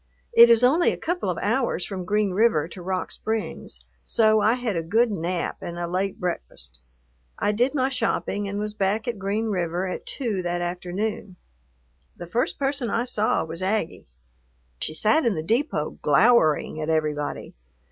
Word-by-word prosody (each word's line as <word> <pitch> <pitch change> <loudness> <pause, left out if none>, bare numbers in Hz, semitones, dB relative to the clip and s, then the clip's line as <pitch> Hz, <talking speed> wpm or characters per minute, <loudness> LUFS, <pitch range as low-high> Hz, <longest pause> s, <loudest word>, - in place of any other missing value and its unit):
It 235 0 +9
is 235 +1 +5
only 310 +8 +4
a - - -4
couple 350 +2 -2
of - - -2
hours - - 0
from 185 -3 -5
Green 210 +1 +1
River 185 -6 +2
to 180 +2 -10
Rock 185 +1 -3
Springs, 220 - -4 0.2
so 215 - +3
I 220 - +4
had 245 -5 -2
a 165 - 0
good 220 +8 +2
nap 175 -1 -2
and 175 - -6
a 175 - -2
late 185 +3 -2
breakfast. 60 - -5 0.6
I 205 - +1
did 245 +7 +1
my 260 -2 +2
shopping 225 -5 -1
and 200 +1 -4
was 210 0 -3
back 210 +2 -1
at 235 -4 -3
Green 200 +4 -1
River 175 -2 -1
at 185 - -5
two 225 -9 -2
that 175 0 -2
afternoon. 180 +3 -3 0.8
The - - -7
first 230 +9 -1
person 270 -3 -1
I 230 - 0
saw 220 -8 +1
was 165 +2 -7
Aggie. 195 - -2 0.7
She 155 - -3
sat 220 - +3
in 230 -5 +1
the 155 - -3
depot, 225 - -1
glowering 155 - +3
at 155 - -3
everybody. 150 -2 -1
200 Hz, 175 wpm, -24 LUFS, 175-230 Hz, 0.8 s, It